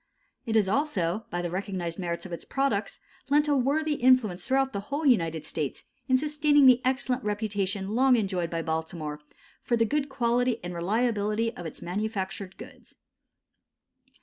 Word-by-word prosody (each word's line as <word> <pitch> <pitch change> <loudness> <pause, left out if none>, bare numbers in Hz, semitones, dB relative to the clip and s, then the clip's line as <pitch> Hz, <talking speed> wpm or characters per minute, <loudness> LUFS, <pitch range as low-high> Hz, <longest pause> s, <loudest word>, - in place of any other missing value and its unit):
It 225 - 0
has 210 -3 +4
also, 210 - 0
by 175 0 -3
the 175 - -3
recognized 185 -3 -3
merits 170 -1 -3
of 185 - -8
its 170 - -6
products, 220 -7 -1 0.3
lent 295 +1 +4
a 295 - +3
worthy 295 +4 +1
influence 245 -9 +3
throughout 265 0 +1
the 200 - -2
whole 290 +3 -2
United 165 - +2
States 145 -3 -4 0.2
in 260 -1 +4
sustaining 295 0 +3
the 255 -1 +7
excellent 260 0 0
reputation 205 -2 -2
long 255 +4 +4
enjoyed 190 -6 -1
by 165 0 -3
Baltimore 160 -2 -3 0.4
for 240 - 0
the 230 - +3
good 285 +4 -1
quality 245 -1 +1
and 175 0 -5
reliability 215 +4 0
of 175 - -6
its - - -9
manufactured 195 0 -4
goods. - - -13
215 Hz, 160 wpm, -27 LUFS, 180-260 Hz, 0.4 s, the